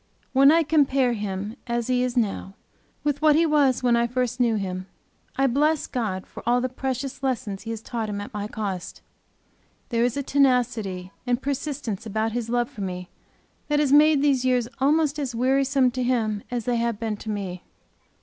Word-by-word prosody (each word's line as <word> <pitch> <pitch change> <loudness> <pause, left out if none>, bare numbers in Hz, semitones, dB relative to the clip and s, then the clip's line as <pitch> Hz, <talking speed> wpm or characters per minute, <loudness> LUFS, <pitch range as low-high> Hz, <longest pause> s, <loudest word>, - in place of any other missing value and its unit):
When 275 +2 +7
I 330 +1 +4
compare 275 -5 +3
him, 205 +1 -4
as 235 -1 -1
he 250 0 +1
is 250 0 -2
now, 200 -3 -1 0.5
with 290 -1 -1
what 305 -1 +5
he 330 +2 +4
was 285 -5 +3
when 240 -1 +4
I 235 0 +2
first 250 0 -2
knew 235 -2 +3
him 185 -2 -4 0.5
I 270 - +2
bless 295 +4 +2
God 210 -7 -3
for - - -10
all 245 +1 +4
the 255 +1 -1
precious 265 +1 -4
lessons 250 -7 -2
He 225 - -8
has 225 -1 -5
taught 225 -3 -3
him 205 -1 -3
at 205 - -7
my 205 0 -3
cost. 200 -5 -5 0.9
There, 235 -2 +1
is 245 +2 0
a 280 - -1
tenacity 240 -9 +1 0.2
and 245 -1 +1
persistence 270 -7 -3
about 220 +1 -1
his 230 0 -3
love 240 0 +1
for 210 - -10
me 180 -1 -5 0.6
that 295 0 +2
has 285 -2 +2
made 300 -1 +6
these 275 -3 +3
years 250 -2 +2
almost 295 +2 +2
as 260 -5 -3
wearisome 265 +1 +2
to 255 +1 -3
him 225 -5 0
as 240 -3 -3
they 245 -1 +1
have 230 -2 -1
been 225 -2 -2
to 220 - -8
me. 190 -4 -4
245 Hz, 195 wpm, -24 LUFS, 220-270 Hz, 0.9 s, When